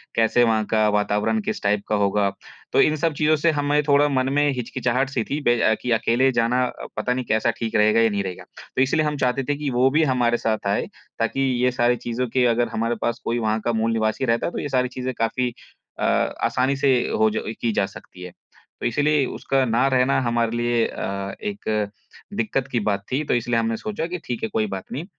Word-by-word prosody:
कैसे 115 +2 +3
वहाँ 110 -2 +2
का 110 -1 +3
वातावरण 105 - +1
किस 210 0 -4
टाइप 100 0 +1
का 105 - +1
होगा? 100 0 +2 0.4
तो - - +5
इन 155 - +3
सब 160 +1 0
चीज़ों 155 +2 +2
से 160 +2 +2
हमें 145 0 +1
थोड़ा 145 +1 +5
मन 130 -1 +1
में 145 0 +3
हिचकिचाहट 125 +1 -1
सी 130 -4 -1
थी 145 +6 -3
बे 120 -1 +3 0.2
की 125 - -2
अकेले 120 +3 +2
जाना 120 +1 +1
अ, - - -7
पता 125 - 0
नहीं 125 0 -3
कैसा 110 +2 +1
ठीक 115 -2 -3
रहेगा 105 +2 +4
या 115 - +4
नहीं 100 -1 -1
रहेगा। 95 -2 -6 0.3
तो 130 - +2
इसलिए 155 +4 +2
हम 150 -1 -1
चाहते 130 +1 0
थे 145 - +2
कि 150 -1 -2
वो 125 +2 +3
भी 155 +2 +3
हमारे 125 -4 +2
साथ 110 -3 -2
आए 100 - 0 0.3
ताकि 115 +4 0 0.2
ये 125 - +3
सारी 120 -1 +2
चीज़ों 120 +2 -1
के 130 -1 +3
अगर 120 +1 +2
हमारे 115 +1 0
पास 120 0 -1
कोई 120 +1 0
वहाँ 110 -1 0
का 120 - +1
मूल 110 +1 +1
निवासी 110 +3 0
रहता 115 +6 +1
तो - - -4
ये 145 - -4
सारी 125 -1 +1
चीज़े 130 0 -2
काफ़ी 125 +2 -1 0.5
अ, - - -2
आसानी 130 +2 +1
से 135 -1 +3 0.2
हो 110 0 +5
ज 110 - -3 0.2
की 115 - +1
जा 100 - +1
सकती 90 -1 -12
है। 90 - -8 0.5
तो - - -3
इसीलिए 145 +3 +2
उसका 135 +1 -1
ना 115 +2 +2
रहना 130 0 +2
हमारे 120 -1 0
लिए 120 -1 +1
अ, 100 0 -5
एक 110 - -2 0.5
दिक्कत 135 - -1
की 120 - +1
बात 100 -2 -1
थी, 140 +4 0
तो - - 0
इसलिए 120 -1 +1
हमने 115 0 -1
सोचा 210 -6 -4
कि 180 +1 -5
ठीक 120 -3 -4
है 110 - -1
कोई 110 -1 +1
बात 95 -1 -6
नहीं। 155 +6 -4
120 Hz, 225 wpm, -23 LUFS, 110-135 Hz, 0.5 s, तो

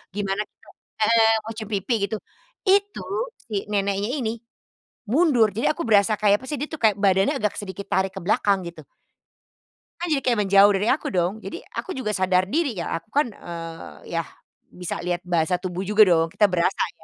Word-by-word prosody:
gimana 200 0 -1
kita - - -27 0.4
heeh, 225 -1 +5
mau 220 - -6
cium 215 -1 -7
pipi, 200 +4 -1
gitu. 220 - -3 0.5
Itu, 400 +1 +3 0.5
si 220 - -5 0.2
neneknya 200 +1 0
ini, 225 -4 -1 0.8
mundur, 255 -5 +4
jadi 235 +7 +1
aku 340 - -6
berasa 205 0 +4
kayak, 205 -1 +5
apa 260 - -13
sih, 295 - -2
dia 295 - -2
tuh 315 - -6
kayak, 215 -2 +5
badannya 195 0 +3
agak 210 -1 0
sedikit 200 0 -6
tarik 190 0 0
ke 195 - -7
belakang, 200 +2 +2
gitu. 170 - -13 1.2
Kan 350 - -2
jadi 275 - +1
kayak 240 -4 +1
menjauh 200 +1 +6
dari 205 +3 -1
aku 290 - -3
dong, 180 0 0
jadi 335 - -6 0.2
aku - - -5
juga 215 -5 -2
sadar 185 -1 +2
diri 275 - -1
ya, 170 - -3 0.2
aku 170 - -36
kan, 290 - +4
eee, 165 -2 -9
yah, 165 -1 -1 0.4
bisa 180 -1 -5
lihat 175 0 -3
bahasa 175 0 +1
tubuh 180 0 -4
juga 210 +2 +5
dong, 165 -3 +3
kita 210 - +3
berasa 180 -1 +1
ya, - - -24
200 Hz, 190 wpm, -23 LUFS, 185-225 Hz, 1.2 s, menjauh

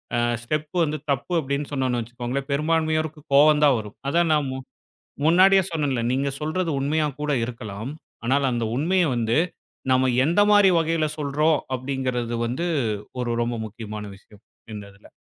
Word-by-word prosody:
அ, - - +1 0.3
step 150 +3 -3
வந்து 155 -1 -1
தப்பு 140 +6 -2
அப்டின்னு 140 0 -3
சொன்னோம்னு 130 -3 0
வச்சுக்கோங்களேன் 125 +4 -5
பெரும்பான்மையோருக்கு 155 +1 0
கோவம் 150 +1 +6
தான் 135 -4 +4
வரும். 105 -1 -9
அதான் 170 +1 +2
நான், 150 -2 +1
முன் 130 0 -6 0.6
முன்னாடியே 190 +3 +6
சொன்னேன்ல 140 -7 -1
நீங்க 135 +2 0
சொல்றது 165 +3 -1
உண்மையா 150 +2 +1
கூட 150 0 -1
இருக்கலாம், 115 -1 -6 0.3
ஆனால், 135 +3 +2
அந்த 120 -1 -1
உண்மைய 180 +5 +2
வந்து 115 +4 +1 0.5
நம்ம 130 0 +4 0.2
எந்த 170 +6 +2
மாதிரி 205 -2 +6
வகையில 165 -1 0
சொல்றோம் 150 +2 +2 0.2
அப்டிங்கிறது 130 -2 -2
வந்து 130 +9 -2 0.5
ஒரு 120 - -2
ரொம்ப 120 0 -2
முக்கியமான 105 -1 -7
விஷயம். 105 +1 -20 0.3
இந்த 105 -1 -7
இதுல. 100 - -19
140 Hz, 150 wpm, -24 LUFS, 120-155 Hz, 0.6 s, கோவம்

